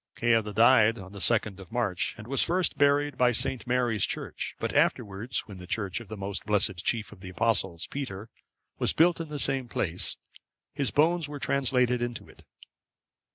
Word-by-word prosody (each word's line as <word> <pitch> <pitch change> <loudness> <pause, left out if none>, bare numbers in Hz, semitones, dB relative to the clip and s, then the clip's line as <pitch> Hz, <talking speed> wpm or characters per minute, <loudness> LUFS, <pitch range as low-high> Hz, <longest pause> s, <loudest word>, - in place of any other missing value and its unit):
Ceadda 115 -3 +2
died 115 +1 +5
on 95 -2 -10
the 100 - -9
2nd 105 -1 +1
of 95 +2 -12
March,(554) 115 -7 -1
and 110 - -10
was 135 +1 +1
first 180 +1 +1
buried 145 0 +2
by 125 -1 +5
St. 125 +2 -1
Mary's 120 -5 +1
Church, - - -3
but - - -2
afterwards, 110 +3 0
when 100 -3 -11
the 90 - -10
church 100 +2 -2
of 115 - -11
the 110 - -7
most 100 0 -4
blessed 105 -3 +1
chief 110 +1 0
of 105 - -13
the 95 0 -9
Apostles, 95 -4 0
Peter, 115 -7 -6 0.5
was - - +1
built 170 +1 +3
in 160 - -6
the 150 - -4
same 135 -3 0
place, 90 -6 -1 0.6
his 140 -2 0
bones 160 +1 +2
were 145 - -6
translated 125 -3 +1
into 120 -1 -4
it. - - -18
115 Hz, 185 wpm, -28 LUFS, 100-135 Hz, 0.6 s, died